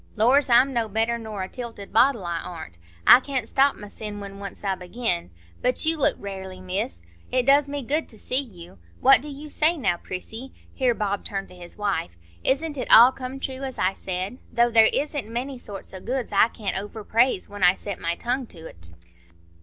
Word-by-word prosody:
Lors! 255 Hz, +6 st, +4 dB
I'm 250 Hz, +3 st, +5 dB
no 230 Hz, -3 st, 0 dB
better 225 Hz, +3 st, 0 dB
nor 215 Hz, -4 st, -5 dB
a -, -, -4 dB
tilted 230 Hz, -3 st, -8 dB
bottle, 235 Hz, -4 st, +3 dB
I 170 Hz, -1 st, -2 dB
ar'n't,—I 85 Hz, -, +2 dB
can't 260 Hz, -3 st, -3 dB
stop 275 Hz, +3 st, +3 dB
mysen 210 Hz, 0 st, -8 dB
when 200 Hz, -1 st, -8 dB
once 200 Hz, +1 st, -8 dB
I 195 Hz, -1 st, 0 dB
begin. 180 Hz, -, -2 dB, 0.3 s
But 250 Hz, +4 st, +2 dB
you 325 Hz, +1 st, +3 dB
look 300 Hz, -, +3 dB
rarely, 190 Hz, -2 st, -7 dB
Miss; 185 Hz, -, -4 dB, 0.3 s
it 255 Hz, -1 st, +1 dB
does 280 Hz, +1 st, +4 dB
me 285 Hz, -1 st, -4 dB
good 300 Hz, +6 st, -1 dB
to 220 Hz, -, -16 dB
see 255 Hz, +5 st, -1 dB
you. 175 Hz, -, -13 dB, 0.2 s
What 270 Hz, 0 st, +6 dB
do 300 Hz, -, -9 dB
you 295 Hz, +1 st, -9 dB
say 325 Hz, +3 st, +2 dB
now, 195 Hz, -, 0 dB
Prissy?"—here 240 Hz, +6 st, -4 dB
Bob 200 Hz, -2 st, -2 dB
turned 195 Hz, -1 st, -5 dB
to 180 Hz, -, -14 dB
his 175 Hz, -1 st, -11 dB
wife,—"Isn't 205 Hz, -, -2 dB
it -, -, -4 dB
all 240 Hz, +3 st, +10 dB
come 260 Hz, +1 st, -7 dB
true 265 Hz, 0 st, -5 dB
as 265 Hz, -1 st, -5 dB
I 185 Hz, -, +1 dB
said? 190 Hz, +6 st, -4 dB
Though 235 Hz, 0 st, +3 dB
there 225 Hz, -1 st, +6 dB
isn't 290 Hz, -6 st, -1 dB
many 255 Hz, +2 st, -4 dB
sorts 200 Hz, -4 st, -9 dB
o' 190 Hz, -, -7 dB
goods 250 Hz, +1 st, -3 dB
as 200 Hz, -, +2 dB
I -, -, -3 dB
can't 210 Hz, -5 st, -2 dB
over 210 Hz, +2 st, -8 dB
praise 230 Hz, -2 st, +2 dB
when 205 Hz, 0 st, -10 dB
I 180 Hz, +1 st, +6 dB
set 200 Hz, -2 st, -6 dB
my 170 Hz, 0 st, -1 dB
tongue 245 Hz, +5 st, -2 dB
to't." 160 Hz, -, -11 dB
220 Hz, 200 wpm, -24 LUFS, 190-260 Hz, 0.3 s, all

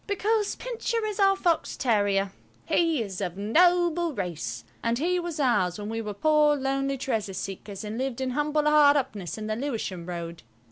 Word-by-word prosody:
Because 415 Hz, +1 st, 0 dB
Pincher 465 Hz, -2 st, -2 dB
is 420 Hz, -1 st, -4 dB
our 390 Hz, -1 st, +5 dB
fox 345 Hz, -4 st, 0 dB
terrier. 205 Hz, -5 st, +1 dB, 0.3 s
He 325 Hz, -7 st, +2 dB
is 195 Hz, -2 st, -6 dB
of 180 Hz, -1 st, -3 dB
noble 345 Hz, -, +3 dB
race, 180 Hz, -6 st, -4 dB, 0.2 s
and 230 Hz, 0 st, 0 dB
he 355 Hz, +6 st, +1 dB
was 345 Hz, -3 st, -4 dB
ours 210 Hz, -10 st, +2 dB
when 210 Hz, 0 st, -5 dB
we 225 Hz, 0 st, -3 dB
were 210 Hz, -2 st, -5 dB
poor, 300 Hz, +4 st, +4 dB
lonely 275 Hz, 0 st, -1 dB
treasure 225 Hz, -6 st, -2 dB
seekers 195 Hz, +1 st, -6 dB
and 215 Hz, +2 st, -5 dB
lived 265 Hz, -2 st, -2 dB
in 260 Hz, -1 st, -1 dB
humble 295 Hz, +2 st, 0 dB
hard 300 Hz, -1 st, +6 dB
upness 215 Hz, -11 st, -3 dB
in 215 Hz, -, -5 dB
the 215 Hz, 0 st, -2 dB
Lewisham 220 Hz, -9 st, -4 dB
Road. 170 Hz, -1 st, -6 dB
265 Hz, 180 wpm, -27 LUFS, 205-325 Hz, 0.3 s, hard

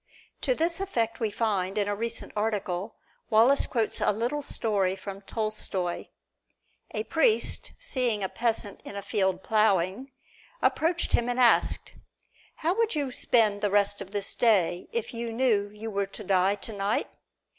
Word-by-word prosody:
To -, -, +1 dB
this 335 Hz, -2 st, 0 dB
effect 235 Hz, -, -1 dB
we 225 Hz, -3 st, 0 dB
find, 200 Hz, -3 st, -1 dB
in 205 Hz, -1 st, +1 dB
a 205 Hz, -, -1 dB
recent 230 Hz, +2 st, -3 dB
article, 210 Hz, -2 st, -2 dB, 0.3 s
Wallace 235 Hz, +6 st, +5 dB
quotes 230 Hz, -4 st, -1 dB
a -, -, +3 dB
little 240 Hz, +8 st, -2 dB
story 200 Hz, -8 st, 0 dB
from 195 Hz, 0 st, -8 dB
Tolstoy: 200 Hz, -4 st, -2 dB, 0.8 s
A -, -, -3 dB
priest, 450 Hz, -3 st, +1 dB
seeing 250 Hz, -, 0 dB
a -, -, +1 dB
peasant 225 Hz, -2 st, -2 dB
in -, -, -8 dB
a 200 Hz, -, -5 dB
field 190 Hz, -3 st, 0 dB
plowing, 210 Hz, +3 st, +1 dB, 0.5 s
approached 335 Hz, -4 st, +1 dB
him 240 Hz, +1 st, +2 dB
and 245 Hz, +1 st, -1 dB
asked, 245 Hz, -2 st, +3 dB, 0.6 s
"How 335 Hz, +4 st, 0 dB
would 455 Hz, -5 st, +1 dB
you 285 Hz, -3 st, -1 dB
spend 215 Hz, -4 st, +2 dB
the 205 Hz, -, +1 dB
rest 205 Hz, 0 st, +2 dB
of 195 Hz, -, -7 dB
this 200 Hz, -1 st, -2 dB
day 190 Hz, -7 st, +2 dB
if 465 Hz, -, -3 dB
you 235 Hz, 0 st, -4 dB
knew 225 Hz, -4 st, +1 dB
you 215 Hz, +2 st, -7 dB
were 200 Hz, -1 st, -1 dB
to -, -, -8 dB
die 190 Hz, 0 st, +2 dB
tonight?" 205 Hz, 0 st, -2 dB
215 Hz, 155 wpm, -27 LUFS, 200-240 Hz, 0.8 s, Wallace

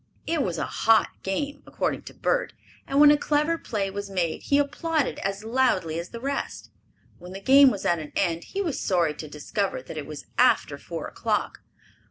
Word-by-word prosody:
It 325 Hz, -2 st, 0 dB
was 175 Hz, -8 st, -1 dB
a -, -, -1 dB
"hot" 225 Hz, 0 st, +3 dB
game, 280 Hz, +10 st, -3 dB
according -, -, -2 dB
to -, -, -10 dB
Bert, -, -, 0 dB, 0.3 s
and 275 Hz, -, +1 dB
when 295 Hz, 0 st, +9 dB
a 295 Hz, -, +5 dB
clever 300 Hz, +3 st, +1 dB
play 200 Hz, -3 st, -2 dB
was 200 Hz, 0 st, -5 dB
made 180 Hz, -4 st, -1 dB
he 280 Hz, -, +2 dB
applauded 295 Hz, 0 st, 0 dB
as 195 Hz, +1 st, -3 dB
loudly 220 Hz, -9 st, +1 dB
as 170 Hz, -, -6 dB
the 235 Hz, -, -8 dB
rest. 275 Hz, +3 st, -4 dB, 0.5 s
When 180 Hz, +1 st, -10 dB
the 195 Hz, -, -6 dB
game 270 Hz, +6 st, +7 dB
was 200 Hz, -6 st, -4 dB
at 170 Hz, -1 st, +2 dB
an 150 Hz, -1 st, -8 dB
end 170 Hz, -3 st, 0 dB
he 400 Hz, +1 st, -3 dB
was 325 Hz, -7 st, -2 dB
sorry 170 Hz, -5 st, +1 dB
to 155 Hz, +1 st, -8 dB
discover 170 Hz, +7 st, -3 dB
that -, -, -9 dB
it 145 Hz, -, -7 dB
was 150 Hz, -2 st, -8 dB
after -, -, +3 dB
four -, -, -6 dB
o'clock. -, -, -2 dB
205 Hz, 200 wpm, -26 LUFS, 175-285 Hz, 0.5 s, when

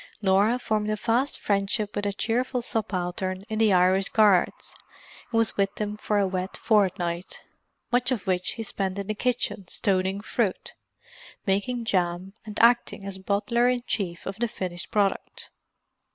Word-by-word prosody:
Norah 205 Hz, +4 st, +3 dB
formed 215 Hz, -3 st, -1 dB
a 215 Hz, -, 0 dB
fast 240 Hz, +6 st, 0 dB
friendship 200 Hz, +1 st, 0 dB
with 205 Hz, 0 st, -1 dB
a -, -, 0 dB
cheerful 245 Hz, +4 st, -1 dB
subaltern 185 Hz, -3 st, -2 dB
in 220 Hz, 0 st, -2 dB
the 220 Hz, -2 st, +4 dB
Irish 185 Hz, +1 st, +4 dB
Guards, 205 Hz, -5 st, +3 dB, 0.6 s
who 230 Hz, -, -1 dB
was 225 Hz, -1 st, +2 dB
with 195 Hz, 0 st, +1 dB
them 210 Hz, -1 st, -3 dB
for 210 Hz, 0 st, -1 dB
a 200 Hz, -, +3 dB
wet 185 Hz, 0 st, -3 dB
fortnight, 185 Hz, -4 st, 0 dB, 0.5 s
much 245 Hz, 0 st, +2 dB
of 235 Hz, -7 st, -1 dB
which 180 Hz, -1 st, +1 dB
he 225 Hz, -, -5 dB
spent 195 Hz, -2 st, -3 dB
in 200 Hz, -, -3 dB
the 215 Hz, -, -2 dB
kitchen 235 Hz, -4 st, -1 dB
stoning 190 Hz, +1 st, 0 dB
fruit, 210 Hz, -1 st, -2 dB, 0.7 s
making 230 Hz, +5 st, 0 dB
jam, 180 Hz, -2 st, -1 dB
and 210 Hz, -, -6 dB
acting 235 Hz, -4 st, +3 dB
as 195 Hz, -1 st, -5 dB
bottler 220 Hz, +5 st, +1 dB
in 250 Hz, -1 st, 0 dB
chief 175 Hz, -5 st, -3 dB
to -, -, -3 dB
the 225 Hz, +4 st, -2 dB
finished 180 Hz, -5 st, -5 dB
product. 205 Hz, -3 st, -1 dB
200 Hz, 160 wpm, -26 LUFS, 190-225 Hz, 0.7 s, the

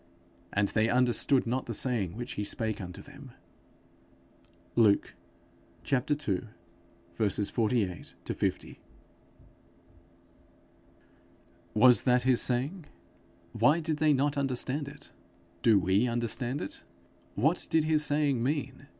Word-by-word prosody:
And 100 Hz, 0 st, +1 dB
they 110 Hz, +1 st, +1 dB
understood 125 Hz, +2 st, +3 dB
not 125 Hz, +3 st, -2 dB
the 115 Hz, -, -3 dB
saying 105 Hz, -7 st, -1 dB
which 120 Hz, 0 st, -5 dB
he 105 Hz, -, -3 dB
spake 110 Hz, +1 st, -2 dB
unto 90 Hz, -1 st, -8 dB
them. -, -, -13 dB, 1.4 s
Luke 105 Hz, -4 st, +3 dB, 0.8 s
ii. 135 Hz, -6 st, 0 dB, 0.8 s
48 105 Hz, -2 st, -1 dB
50. -, -, -3 dB, 3.0 s
Was 125 Hz, +3 st, +6 dB
that 125 Hz, -1 st, +2 dB
his 130 Hz, -2 st, +3 dB
saying? 140 Hz, +8 st, -1 dB, 0.7 s
Why 125 Hz, +9 st, +3 dB
did 160 Hz, -2 st, -2 dB
they 155 Hz, 0 st, +3 dB
not 145 Hz, +1 st, +1 dB
understand 135 Hz, +1 st, -2 dB
it? 145 Hz, 0 st, -11 dB, 0.5 s
Do 110 Hz, -3 st, +5 dB
we 95 Hz, +6 st, +2 dB
understand 120 Hz, +3 st, -2 dB
it? 100 Hz, -, -6 dB, 0.5 s
What 155 Hz, -, +1 dB
did 160 Hz, -1 st, +3 dB
his 155 Hz, -1 st, +2 dB
saying 145 Hz, -4 st, +1 dB
mean? 135 Hz, +1 st, -3 dB
125 Hz, 105 wpm, -29 LUFS, 110-145 Hz, 3.0 s, Was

